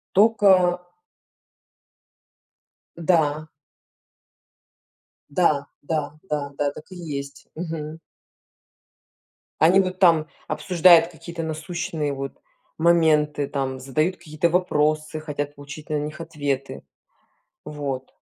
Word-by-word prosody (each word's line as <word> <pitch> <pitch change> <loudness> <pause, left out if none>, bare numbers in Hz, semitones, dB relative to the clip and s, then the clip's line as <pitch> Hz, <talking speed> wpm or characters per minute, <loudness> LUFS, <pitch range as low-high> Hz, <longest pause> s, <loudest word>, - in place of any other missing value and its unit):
Тока. 190 -4 +4 2.1
Да. 155 -3 +1 1.8
Да, 145 -3 +2 0.2
да, 150 -1 -2 0.2
да, 145 -2 -2
да, 145 -1 +1
так 155 - -11
и 185 - -9
есть. 140 -5 -7
Мгм. 160 -1 -5 1.6
Они 175 +5 +6
вот 185 -1 -1
там 165 -4 +5 0.2
обсуждают 170 -2 +5
какие-то 170 0 -7
насущные, 160 -1 -3
вот, 135 0 -5 0.4
моменты, 155 -3 +3
там 135 -2 -3
задают 155 +7 -1
какие-то 155 +2 -1
вопросы, 155 -3 +1
хотят 145 -1 -4
получить 145 +2 -10
на 150 - 0
них 150 +2 -5
ответы. 145 -4 -3 0.8
Вот. 140 -3 -5
155 Hz, 90 wpm, -23 LUFS, 145-170 Hz, 2.1 s, Они